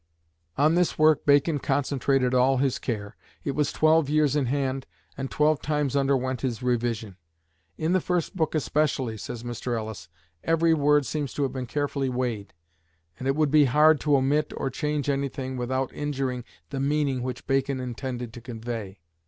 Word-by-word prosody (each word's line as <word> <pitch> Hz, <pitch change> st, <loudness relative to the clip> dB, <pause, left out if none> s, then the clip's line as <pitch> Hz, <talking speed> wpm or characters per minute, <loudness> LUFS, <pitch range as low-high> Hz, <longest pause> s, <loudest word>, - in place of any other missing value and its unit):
On 150 Hz, +3 st, +4 dB
this 175 Hz, -1 st, +1 dB
work 155 Hz, -1 st, +4 dB
Bacon 145 Hz, +2 st, +4 dB
concentrated 135 Hz, -2 st, +1 dB
all 130 Hz, +1 st, +4 dB
his 135 Hz, -1 st, +1 dB
care. 105 Hz, -4 st, -4 dB, 0.3 s
It 140 Hz, -, -1 dB
was 145 Hz, +1 st, 0 dB
twelve 155 Hz, -2 st, +3 dB
years 150 Hz, -1 st, +2 dB
in 140 Hz, -4 st, +1 dB
hand, 135 Hz, 0 st, -1 dB, 0.3 s
and 135 Hz, 0 st, -4 dB
twelve 150 Hz, 0 st, +2 dB
times 150 Hz, -3 st, -1 dB
underwent 130 Hz, -2 st, +1 dB
his 125 Hz, -2 st, -3 dB
revision. 115 Hz, -5 st, -1 dB, 0.6 s
"In 160 Hz, +3 st, 0 dB
the 185 Hz, -, +3 dB
first 180 Hz, +2 st, -1 dB
book 160 Hz, -3 st, 0 dB
especially," 145 Hz, -6 st, 0 dB
says 115 Hz, +2 st, -7 dB
Mr. 120 Hz, 0 st, -3 dB
Ellis, 110 Hz, -7 st, -6 dB, 0.3 s
"every 165 Hz, 0 st, +3 dB
word 150 Hz, -1 st, +3 dB
seems 145 Hz, -2 st, -3 dB
to 145 Hz, -, 0 dB
have 130 Hz, -2 st, -1 dB
been 130 Hz, -2 st, -4 dB
carefully 140 Hz, 0 st, -1 dB
weighed; 120 Hz, -5 st, -3 dB, 0.7 s
and 130 Hz, -, -3 dB
it 135 Hz, -, +2 dB
would 150 Hz, -2 st, +2 dB
be 150 Hz, -1 st, +6 dB
hard 150 Hz, +3 st, +5 dB
to 145 Hz, -2 st, +3 dB
omit 140 Hz, +3 st, +1 dB
or 135 Hz, -, -2 dB
change 150 Hz, -2 st, -2 dB
anything 135 Hz, -1 st, -2 dB
without 130 Hz, +1 st, -2 dB
injuring 135 Hz, -4 st, -3 dB, 0.3 s
the 135 Hz, -, -3 dB
meaning 140 Hz, -2 st, 0 dB
which 125 Hz, -1 st, -5 dB
Bacon 135 Hz, 0 st, 0 dB
intended 125 Hz, -1 st, -5 dB
to 120 Hz, -, -9 dB
convey." 115 Hz, -5 st, -6 dB
135 Hz, 170 wpm, -26 LUFS, 125-150 Hz, 0.7 s, be